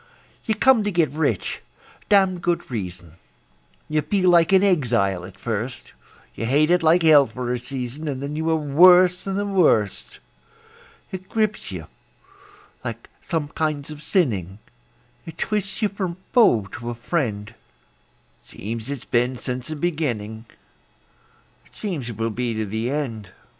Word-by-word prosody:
You 220 - 0
come 250 0 +4
to 205 - 0
get 170 -4 +2
rich 145 - -1 0.5
(damned 190 -3 +4
good 175 -6 -1
reason); 90 -6 -6 0.7
You 155 0 +1
feel 185 +3 +2
like 170 0 +5
an 190 0 +5
exile 115 - +1
at 95 0 -13
first; 120 +4 -5 0.4
You 115 - -4
hate 150 +6 +3
it 180 0 +4
like 165 +2 +4
hell 150 -4 +7
for 125 +2 -4
a 125 - -2
season, 130 +4 -5
And 135 -3 -3
then 140 +2 -5
you 160 +1 -1
are 160 - +3
worse 180 +5 +5
than 195 -1 -2
the 205 +1 -1
worst. 165 - +1 0.9
It 190 0 -7
grips 215 -2 -1
you - - -6 1.0
like - - -7
some 160 -4 -2
kinds 155 -1 -2
of 150 -1 -9
sinning; 105 - 0 0.7
It 165 0 -9
twists 210 +1 -2
you 210 - +3
from 190 -4 -4 0.2
foe 170 - +5
to 120 0 -5
a 120 - -4
friend; 115 -6 -2 0.9
It - - -21
seems 115 +4 -6
it's 140 -4 -5
been 125 +1 +1
since 125 +1 -4
the 155 - -4
beginning; 120 -10 -3 1.2
It - - -25
seems 165 - -4
it 115 - -7
will 115 0 -1
be 120 +1 -2
to 110 0 -2
the 110 +4 -3
end. 125 -8 -3
145 Hz, 160 wpm, -23 LUFS, 115-175 Hz, 1.2 s, hell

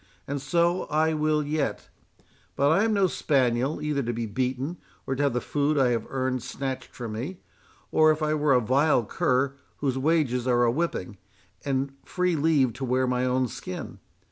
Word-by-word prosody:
—and 140 0 -3
so 170 +6 +1
I 155 +1 +1
will 155 0 +1
yet;—but 145 -1 -3
I 195 +6 +4
am 225 - +1
no 200 -2 +3
spaniel, 135 -4 +1
either 150 -2 0
to 120 -2 -2
be 115 0 -3
beaten, 130 - -2 0.3
or 135 - -1
to 135 - -2
have 140 -3 +2
the 125 - +1
food 145 +1 0
I 130 -3 +4
have 115 -2 -1
earned 130 -1 -1
snatched 130 +1 -5
from 120 -3 -5
me, 130 +13 -5 0.6
as 155 0 +6
if 155 0 +1
I 155 0 +1
were 150 -2 +2
a 125 - +4
vile 130 +1 +2
cur, 130 +5 +1 0.2
whose 135 -2 -1
wages 130 -5 +1
are 120 -1 +3
a 120 - +3
whipping, 120 - -3 0.4
and 135 0 -1
free 180 -1 0
leave 145 -5 +2
to - - -1
wear 130 0 +1
my 125 0 0
own 130 0 +1
skin. 90 -4 -7
135 Hz, 185 wpm, -26 LUFS, 125-155 Hz, 0.6 s, as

